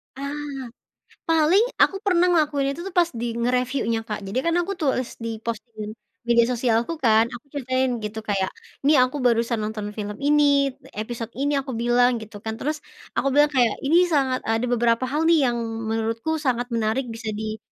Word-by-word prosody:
Ah, 280 +1 -4 1.0
paling 325 +6 +5 0.2
aku 390 - +4
pernah 360 -2 +4
ngelakuin 295 -5 +2
itu 340 - -7
tuh 375 - -8
pas 345 - +4
di - - -1
nge-reviewnya 250 -1 0
Kak, 210 - -3
jadi 230 +7 -1
kan 335 0 +2
aku 390 +3 -3
tulis 265 -4 -1
di 225 -1 -4
post 230 -2 -4
di 215 - -8 0.5
media 235 -1 +5
sosialku 235 +3 +1
kan, 225 -2 +5
aku 240 - -9
ceritain 260 -1 0
gitu 215 +1 -4
kayak, 200 -3 -1 0.4
"Ini 300 - +6
aku 255 +3 -5
barusan 235 0 +2
nonton 215 -1 -4
film 210 -1 -5
ini, 285 -1 +4 0.2
episode 230 +1 -5
ini," 285 +2 -1
aku 270 -1 -3
bilang 240 +2 +3
gitu 215 -1 -10
kan, 220 - -2
terus 305 +2 -2 0.4
aku - - +1
bilang 295 +1 +5
kayak, 245 -6 +3
"Ini 310 +5 +3
sangat 270 -6 +1
ada 225 +2 +1
beberapa 240 0 +2
hal 300 +4 0
nih 315 -6 +4
yang 240 - -2 0.3
menurutku 225 +7 -1
sangat 250 -5 -1
menarik 230 +3 0
bisa 225 -1 -5
di 215 +1 -4
245 Hz, 180 wpm, -23 LUFS, 225-290 Hz, 1.0 s, Ini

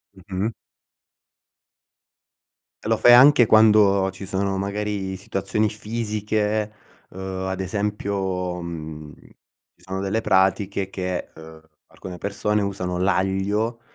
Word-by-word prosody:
Mh-mh. 95 +3 -3 2.3
Lo 110 +1 +1
fai 120 - +7
anche 130 0 +8
quando 105 -3 +5
ci 95 +1 -9
sono, 95 0 -1
magari, 100 -1 -3
situazioni 100 +3 -1
fisiche, 105 -1 -2 0.4
uhm, 95 0 -5
ad 95 0 -3
esempio, 95 -2 -2
mhmm, 80 -3 -7 0.6
ci - - -27
sono 95 +1 -4
delle 100 +3 -1
pratiche 95 0 +1
che 90 -2 -4
uhm, 80 0 -13 0.3
alcune 90 -1 -9
persone 105 +2 -1
usano 95 -2 -3
l'aglio, 95 +5 0
100 Hz, 105 wpm, -23 LUFS, 95-105 Hz, 2.3 s, anche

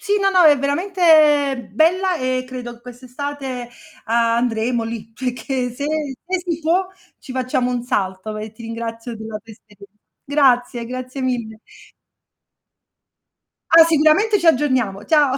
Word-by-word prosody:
Sì 410 0 0
no, 390 - +3
no, 370 -2 +4
è 295 -2 +7
veramente 295 - +3
bella 360 - +2
e 255 0 -1
credo 240 -2 -8
quest'estate, 255 +1 -7 0.4
andremo 230 0 0
lì, 225 -1 -7
perché 250 +1 -3
se 280 +4 -5 0.4
se 370 +1 -1
si 335 -1 -2
può 345 +4 +1 0.3
ci 260 - -10
facciamo 255 -1 -1
un 245 -1 -2
salto 205 -3 -3
e 215 0 -7
ti 225 +1 -14
ringrazio 230 +1 -6
della 220 0 -7
tua 225 - -13
esperienza. 205 -2 -18 0.3
Grazie, 250 -4 +2
grazie 255 +2 -6
mille. 235 -4 -3 2.1
Ah, 330 0 +9
sicuramente 330 +7 +3
ci 345 - -4
aggiorniamo. 255 -9 +1
Ciao! 290 -4 +3
255 Hz, 135 wpm, -20 LUFS, 230-300 Hz, 2.1 s, Ah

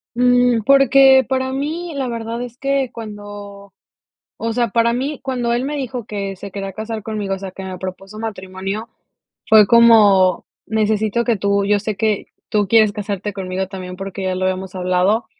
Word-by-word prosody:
Mm, 245 -1 +3
porque, 270 0 +6
para 260 0 -1
mí 320 +5 -3
la 265 -2 -2
verdad 230 0 -4
es 245 0 -9
que 275 -2 0
cuando, 205 -2 -9 0.6
o 230 0 -3
sea, 240 0 0
para 230 +2 +2
mí 270 +4 -2
cuando 250 -3 -2
él 240 +2 0
me 295 +1 -3
dijo 250 -4 -4
que 200 -2 -4
se 195 +1 -9
quería 195 -1 -5
casar 220 +2 -5
conmigo, 205 -2 -3
o - - -6
sea, 195 - -6
que 190 +1 -9
me 185 -1 -6
propuso 190 +3 -8
matrimonio, 195 0 -5 0.6
fue 215 -2 +7
como 205 -6 +5 0.2
necesito 220 +1 0
que 235 -2 +1
tú, 200 0 0
yo 205 0 +3
sé 210 0 -4
que 215 0 0 0.2
tú 210 -1 +1
quieres 220 -2 +5
casarte 205 -1 -4
conmigo 190 -1 -3
también, 185 -2 -7
porque 195 0 -6
ya 185 -1 -1
lo 185 - -2
habíamos 185 0 -2
hablado, 185 +4 +1
215 Hz, 180 wpm, -19 LUFS, 195-240 Hz, 0.6 s, fue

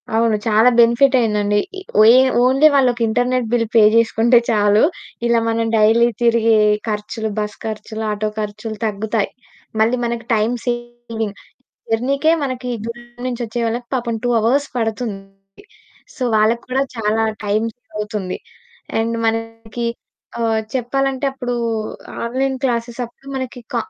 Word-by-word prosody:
అవును. 225 -1 +3
చాలా 220 +2 +5
బెనిఫిట్ 235 +4 +5
అయిందండి. 210 -3 +1 0.2
ఇ - - -11 0.2
ఒయే 230 +4 +8 0.2
ఓన్లీ 270 +4 +5
వాళ్ళకి 250 -3 +2
ఇంటర్నెట్ 245 +1 0
బిల్ 230 -1 +2
పే 225 - +7
చేసుకుంటే 230 +1 +4
చాలు. 210 -1 +3 0.4
ఇలా 235 -1 +3
మనం 230 0 0
డైలీ 225 +2 +5
తిరిగే 230 -1 +4 0.3
ఖర్చులు, 215 +1 -3
బస్ 210 0 -4
ఖర్చులు, 220 0 -5
ఆటో 210 +1 -1
ఖర్చులు 215 +1 -5
తగ్గుతాయి. 215 0 -1 0.5
మళ్ళీ 235 +3 +3
మనకు 235 0 -3
టైమ్ 220 +3 +1
సేవింగ్. 240 -3 -4 0.6
జర్నీకే 275 +7 +2
మనకి 255 -2 -3 0.2
దూరం 240 +1 -7 0.2
నుంచి 245 -1 -4
వచ్చే 225 +2 -5
వాళ్ళకి 240 +1 -3
పాపం 235 -2 -2
2 245 - +1
అవర్స్ 260 +6 +1
పడుతుంది. 225 -2 -2 1.0
సో, 255 - -4
వాళ్ళకి 220 +2 +2
కూడా 265 +2 +1 0.2
చాలా 220 0 +1 0.2
టైమ్ 215 +2 +1
సేవ్ 245 -2 -34
అవుతుంది. 210 -3 -3 0.6
అండ్ 230 +1 -1
మనకి 225 +1 -3 0.6
ఆహ్, 225 -1 +1
చెప్పాలంటే 270 +2 -1
అప్పుడు 245 -2 -3 0.7
ఆన్లైన్ 265 +3 -1
క్లాస్ 235 -2 0 0.2
అప్పుడు 255 +3 -21
మనకి 260 -1 -5
క - - -1
230 Hz, 135 wpm, -19 LUFS, 220-245 Hz, 1.0 s, ఒయే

